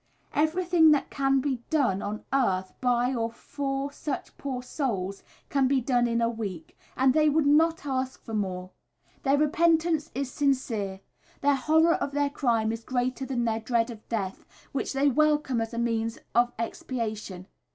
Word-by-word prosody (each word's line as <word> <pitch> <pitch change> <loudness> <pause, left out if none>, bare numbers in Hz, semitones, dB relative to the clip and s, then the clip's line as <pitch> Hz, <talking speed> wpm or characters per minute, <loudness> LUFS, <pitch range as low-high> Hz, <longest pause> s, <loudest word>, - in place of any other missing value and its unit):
Everything 330 +1 +4
that 295 -2 +2
can 270 -1 +2
be 270 -2 -1
done 250 -11 +2
on 210 +1 -5
earth 190 -9 +1
by 245 0 +2
or 230 -2 -1
for 275 +3 -4
such 285 -1 -5
poor 260 -3 -4
souls, 200 -9 -3 0.3
can 275 -2 +2
be 270 0 +3
done 245 -1 +2
in 235 0 0
a 230 - +3
week, 200 -8 -5 0.2
and 260 0 +4
they 305 +1 +4
would 305 0 +2
not 320 +2 +3
ask 260 -2 -2
for 225 - -7
more. 185 -3 -3 0.5
Their 275 +1 +3
repentance 320 0 +2
is 270 -1 -2
sincere, 225 -9 -1 0.4
their 285 0 +4
horror 320 +5 +4
of 280 - -2
their 285 0 +1
crime 230 -6 +1
is 225 0 -5
greater 255 +2 -2
than 245 -3 -1
their 225 -1 0
dread 230 +1 0
of 220 -2 -13
death, 195 -5 -3 0.3
which 275 - -2
they 275 +1 +2
welcome 295 -3 +2
as 225 - -3
a 235 - -6
means 230 -1 -1 0.2
of 240 0 +3
expiation. 220 -5 -4
255 Hz, 170 wpm, -27 LUFS, 225-285 Hz, 0.5 s, Everything